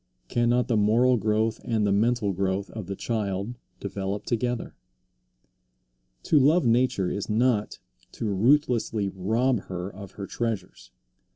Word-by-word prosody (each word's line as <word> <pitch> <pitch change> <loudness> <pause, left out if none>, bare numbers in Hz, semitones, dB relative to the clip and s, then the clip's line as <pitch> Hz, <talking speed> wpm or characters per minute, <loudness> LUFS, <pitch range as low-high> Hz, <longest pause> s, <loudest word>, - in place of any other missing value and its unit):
Cannot 120 0 +2
the 115 - +1
moral 115 +5 +4
growth 110 +1 0
and 110 -3 0
the 100 - +2
mental 110 0 +2
growth 95 +1 -1
of 110 -5 -7
the 100 - -4
child 100 0 -2 0.3
develop 100 0 -4
together? 120 0 -2 1.5
To 150 - +4
love 155 +5 +4
nature 115 -6 +2
is 100 - -4
not 110 -1 +1 0.4
to - - -5
ruthlessly 115 -1 +2
rob 110 +7 +1
her 90 +1 -5
of 100 0 -10
her 100 - -6
treasures. 105 - -4
110 Hz, 130 wpm, -26 LUFS, 100-120 Hz, 1.5 s, moral